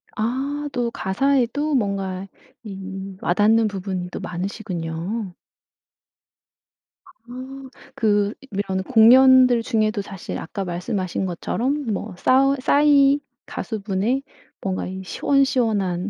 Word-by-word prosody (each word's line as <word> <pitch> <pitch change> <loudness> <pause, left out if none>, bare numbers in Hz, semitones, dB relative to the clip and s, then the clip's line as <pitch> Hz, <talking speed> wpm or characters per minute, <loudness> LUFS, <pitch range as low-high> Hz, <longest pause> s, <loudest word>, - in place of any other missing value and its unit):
아. 245 +5 -1 0.3
또 245 -2 0
가사에도 275 +8 0
뭔가 195 -4 -2 0.4
이 195 -1 -7
와닿는 215 +5 +3
부분이 190 -3 -4
또 - - -5
많으시군요. 180 +1 -4 1.9
아. 260 +2 -9 0.3
그 205 -4 +1 0.2
이런 190 -1 -2
공연들 250 +1 +6
중에도 215 -3 0
사실 195 -1 -7
아까 195 +4 -5
말씀하신 185 +1 -3
것처럼 255 - -2
뭐 200 -1 -5
싸우 270 +6 +3
싸이 285 0 +4 0.3
가수분의 215 +4 -2 0.4
뭔가 190 -1 -2
이 190 +1 -6
시원시원한 220 -7 +1
215 Hz, 220 characters per minute, -22 LUFS, 190-255 Hz, 1.9 s, 공연들